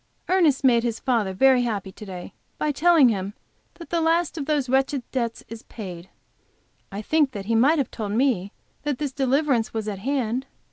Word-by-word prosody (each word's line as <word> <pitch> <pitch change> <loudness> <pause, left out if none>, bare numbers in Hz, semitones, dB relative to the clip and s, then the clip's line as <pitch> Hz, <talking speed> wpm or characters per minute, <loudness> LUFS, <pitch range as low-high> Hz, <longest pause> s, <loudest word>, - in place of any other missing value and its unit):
Ernest 330 -8 +3
made 240 -3 +5
his 230 -1 -2
father 230 -7 0
very 255 +6 +4
happy 205 -5 -3
to 210 - -11
day 180 -2 -8 0.2
by 305 - 0
telling 310 -2 +5
him 200 -1 -3 0.4
that 335 - -12
the 340 -1 +1
last 330 +1 +1
of 295 -4 -5
those 295 -4 0
wretched 265 +1 +1
debts 235 -3 -2
is 230 -1 -9
paid. 185 -5 -9 0.8
I 200 +2 -5
think 295 0 +2
that 200 -3 -6
he 230 - -1
might 270 +8 +4
have 275 - -1
told 210 -3 -4
me 220 -6 +1 0.3
that 290 -3 -2
this 290 -1 -3
deliverance 265 -3 +1
was 220 -1 -2
at 200 -2 -4
hand. 255 +1 -1
250 Hz, 190 wpm, -24 LUFS, 215-285 Hz, 0.8 s, made